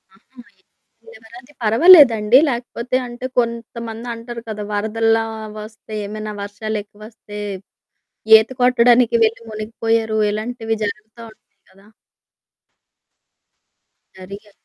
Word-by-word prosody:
ఆహా! 245 +6 -25 0.7
ఇ - - -26
ఏమైనయితే 245 - -16
పర్వాలేదండి. 235 -3 +6
లేకపోతే 245 0 -4
అంటే 240 +1 -8
కొంతమంది 235 0 -5
అంటారు 230 0 -8
కదా 210 -1 -5
వరదల్లా 225 +2 0 0.4
ఒస్తే 220 0 -13
ఏమైనా 215 +1 -6
వర్షాలెక్కువొస్తే 210 +1 -8 1.0
ఈత 220 +1 -1
కొట్టడానికి 245 -1 +4
వెళ్ళి 225 +1 0
మునిగిపోయారు 220 0 -2
ఇలాంటివి 225 +1 -4
జరుగుతా 215 +2 -6
ఉంటాయి 200 -2 -29
కదా! 195 +1 -22 2.3
జరిగాయి? 200 +3 -11
225 Hz, 90 wpm, -19 LUFS, 215-235 Hz, 2.3 s, పర్వాలేదండి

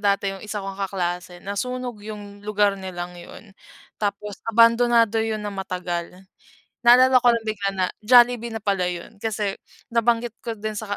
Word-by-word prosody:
dati 200 -1 +1
'yong 195 - -9
isa 210 -1 -4
kong 195 0 -6
kaklase. 180 -2 -3
Nasunog 245 +4 -4
'yong 205 -1 -9
lugar 205 -1 +2
nilang 180 -2 -6
'yon. 195 +4 -12 0.5
Tapos 205 -1 -3 0.2
abandonado 230 0 +5
'yon 220 -1 -2
nang 205 -1 -5
matagal. 180 -3 -4 0.7
Naalala 255 +1 +7
ko 245 - +5
lang 230 -1 -2
bigla 205 -2 -1
na 185 - +2 0.2
Jollibee 240 +1 +5
na - - -2
pala 195 -3 +1
'yon. 175 +3 -8
Kasi 210 -3 -1 0.4
nabanggit 235 0 +1
ko 230 -2 -5
din 215 +1 -4
sa 205 -2 -3
210 Hz, 160 wpm, -23 LUFS, 195-230 Hz, 0.7 s, Naalala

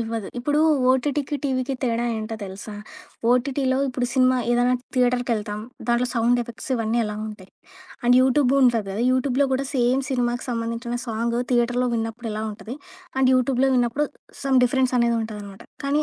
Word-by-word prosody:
ఇవ్వదు. 225 -2 -3
ఇప్పుడు, 290 +5 +1 0.3
ఓటీటీకి, 285 +2 0
టీవీకి 265 0 -1
తేడా 235 -2 0
ఏంటో 220 +1 -4
తెలుసా? 195 +2 -8 0.6
ఓటీటీలో 260 +1 +1
ఇప్పుడు 250 -1 -1
సినిమా 255 -1 +4
ఏదైనా 245 +1 +3 0.2
థియేటర్‌కెళ్తాం. 245 -4 0 0.3
దాంట్లో, 240 +1 +2
సౌండ్ 240 +1 +3
ఎఫెక్ట్స్ 235 +3 -9
ఇవన్నీ 225 0 0
ఎలా 210 -1 -4
ఉంటాయి? 205 -3 -10 0.5
అండ్ 245 +1 +5
యూట్యూబ్‌ 260 0 +3
ఉంటది 235 -5 +3
కదా! 205 +4 -2
యూట్యూబ్‌లో 260 +1 +2
కూడా 265 +1 0
సేమ్ 255 +1 +2
సినిమాకి 245 -1 -1
సంబంధించిన 230 +1 -3
సాంగ్ 235 +1 -1
థియేటర్‌లో 245 +1 +2
విన్నప్పుడు 225 +1 -3
ఎలా 215 +1 -3
ఉంటది? 215 +4 -8 0.4
అండ్ 260 -1 +4
యూట్యూబ్‌లో 255 +1 +2
విన్నప్పుడు 245 +4 +1 0.4
సమ్ 270 -2 +3
డిఫరెన్స్ 255 0 +1
అనేది 235 -1 +2
ఉంటదనమాట. 205 -3 -8 0.2
కానీ 285 +2 +2
245 Hz, 150 wpm, -23 LUFS, 230-260 Hz, 0.6 s, అండ్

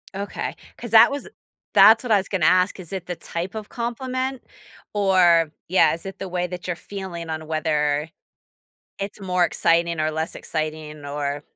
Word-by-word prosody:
Okay, 200 +1 -4 0.2
'cause 240 - -8
that 225 -1 +8
was 285 +6 -5 0.5
that's 225 +3 +7
what 245 - -3
I 210 - +6
was 195 - -2
gonna 185 -5 0
ask, 185 +3 +3
is 180 0 -9
it 185 -2 -5
the 175 - -3
type 175 +4 -5
of 215 -1 -6
compliment 255 +2 -3 0.5
or 180 -5 +4 0.2
yeah, 185 +2 +4
is 170 - -10
it 195 0 -7
the 195 - -5
way 180 0 -1
that 180 0 -7
you're 180 - -1
feeling 175 -3 -7
on 155 0 -5
whether 150 -1 0 0.9
it's 200 +1 -5
more 180 -2 +1
exciting 170 -1 +1
or 155 0 +1
less 160 +1 -3
exciting 155 -1 -5
or, 145 0 -3
180 Hz, 175 wpm, -23 LUFS, 160-200 Hz, 0.9 s, that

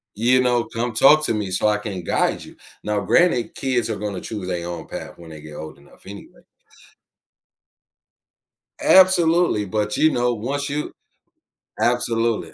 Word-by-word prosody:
You 125 +4 +3
know, 120 -2 +1
"Come 120 +1 -4
talk 150 +7 +5
to 115 - 0
me 105 -3 -3
so 95 +3 +1
I 105 - +1
can 100 -4 -6
guide - - -1
you," - - -15 0.3
now, 105 -1 -1
granted, 125 - +1
kids 125 -4 -1
are 110 - -2
gonna 100 -2 -5
choose 105 -2 -7
they 85 -2 -3
own 85 -2 -7
path - - -8
when 85 -1 -13
they 75 -1 -10
get 75 0 -12
old 80 -1 -9
enough 70 - -20
anyway. 100 +1 -12 2.4
Absolutely, 175 - +4
but, 105 +1 -2
you 155 0 +4
know, 120 0 0
once 140 +6 -3
you 150 +1 -4 0.9
Absolutely, 115 -2 0
115 Hz, 160 wpm, -21 LUFS, 100-130 Hz, 2.4 s, talk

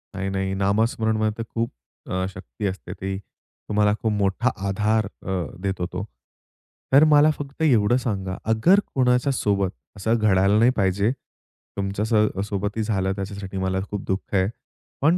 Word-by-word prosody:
नाही, 95 0 -2
नाही. 95 0 -1
नामस्मरणमध्ये 110 +2 +1
तर 115 - -3
खूप 115 +1 0 0.4
अ, 95 0 -1
शक्ती 95 +2 -7
असते. 95 0 -5
ती 95 0 -4
तुम्हाला 105 +1 -2
खूप 110 - +1
मोठा 105 +4 +1 0.2
आधार 105 +2 +1
अ, 95 - -8 0.3
देतो 95 -3 -1
तो. - - -3 0.9
तर 140 - +8
मला 150 0 +6
फक्त 145 +1 -8
एवढं 120 -5 +4
सांगा, 95 -6 -2
अगर 165 - +5 0.2
कोणाच्या 125 +1 +3
सोबत 100 -5 +1 0.3
असं 110 +4 +1
घडायला 100 -1 +3
नाही 120 +2 +5
पाहिजे, 100 +3 +2 0.7
तुमच्या 100 +1 -1
स 115 - -2 0.3
सोबतही 105 +2 -2
झालं 95 -3 0
त्याच्यासाठी 100 -1 -5
मला 95 0 0
खूप 105 -1 -4
दुःख 95 +1 -3
आहे. 95 0 +3 0.5
पण 160 +6 +4
105 Hz, 150 wpm, -24 LUFS, 95-115 Hz, 0.9 s, तर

